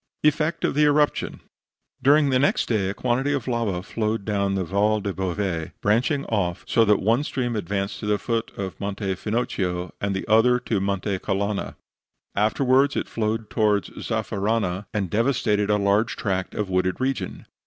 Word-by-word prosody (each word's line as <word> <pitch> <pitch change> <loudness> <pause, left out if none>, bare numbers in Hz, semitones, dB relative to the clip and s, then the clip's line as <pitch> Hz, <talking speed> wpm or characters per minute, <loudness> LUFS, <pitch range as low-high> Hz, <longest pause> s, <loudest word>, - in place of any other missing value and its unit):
EFFECT 155 +2 +2
OF - - 0
THE 150 +1 +4
ERUPTION 150 0 +1 0.6
During 145 0 +5
the 130 - +3
next 140 - +2
day 105 -5 0
a - - -2
quantity 130 +5 0
of 130 -4 -2
lava 115 -7 -1
flowed 110 0 -2
down 100 -2 0
the 95 - 0
Val 105 +4 +1
del 100 -1 -3
Bove, 90 -3 -2
branching 125 +7 +1
off 90 -6 -1
so 115 - +4
that 105 -1 +4
one 115 +7 +2
stream 120 -5 -2
advanced 100 0 -2
to 105 - -5
the 105 0 +2
foot 115 +1 -2
of 95 -2 -5
Monte 100 -1 -2
Finocchio, 90 -4 -2
and 100 -1 -1
the 95 - -4
other 115 +3 +5
to 110 -4 -1
Monte 100 0 -1
Calanna. 100 +1 -2 0.6
Afterwards 130 +6 +3
it - - -1
flowed 110 0 -2
towards 105 -2 +1
Zaffarana, 100 -2 -2
and 105 -3 -1
devastated 105 -3 +1
a 105 - +4
large 105 +3 +2
tract 95 -4 -2
of 105 - -1
wooded 95 0 0
region. 130 0 -2
105 Hz, 170 wpm, -24 LUFS, 100-120 Hz, 0.6 s, During